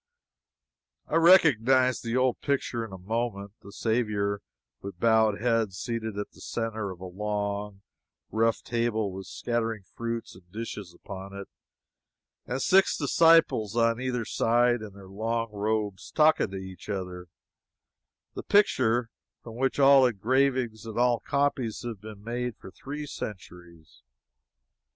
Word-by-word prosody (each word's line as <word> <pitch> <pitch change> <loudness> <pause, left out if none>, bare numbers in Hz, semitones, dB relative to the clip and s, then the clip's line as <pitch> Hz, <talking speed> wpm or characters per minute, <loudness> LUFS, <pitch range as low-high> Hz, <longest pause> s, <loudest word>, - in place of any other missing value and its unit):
I 155 - -3
recognized 130 - +5
the 115 +1 -1
old 130 -1 +1
picture 130 -4 -1
in 110 - -8
a 95 - -7
moment 100 0 -3
the 100 - -12
Saviour 105 -3 -1 0.4
with 100 -3 -8
bowed 110 -2 +3
head 115 -3 +1
seated 110 +2 -4
at 105 - -4
the - - -17
centre 110 -3 -3
of 90 -2 -8
a - - -6
long, 100 +1 -3 0.5
rough 115 +1 +1
table 115 -3 -1
with 95 0 -8
scattering 115 -3 -2
fruits 115 +4 -5
and 90 -1 -18
dishes 105 -3 -6
upon 95 +2 -9
it, 100 -1 -7 1.0
and 125 +2 -2
six 190 +6 +4
disciples 150 - +4
on 115 +1 +2
either 125 -3 -2
side 120 +2 +2
in 105 -2 -8
their 100 -1 -13
long 115 +3 -2
robes, 105 -1 -2
talking 155 -8 +3
to 95 - -6
each 95 +1 -9
other 90 -3 -5 1.1
the - - -5
picture 125 - +2 0.3
from 115 -1 -9
which 135 +3 0
all 135 -1 +7
engravings 125 0 0
and 110 - -7
all 120 -1 +3
copies 140 -5 -1
have 115 -5 -6
been 105 -2 -10
made 120 +1 -3
for 95 - -12
three 145 +7 -7
centuries. 90 - -9
115 Hz, 140 wpm, -27 LUFS, 100-125 Hz, 1.1 s, all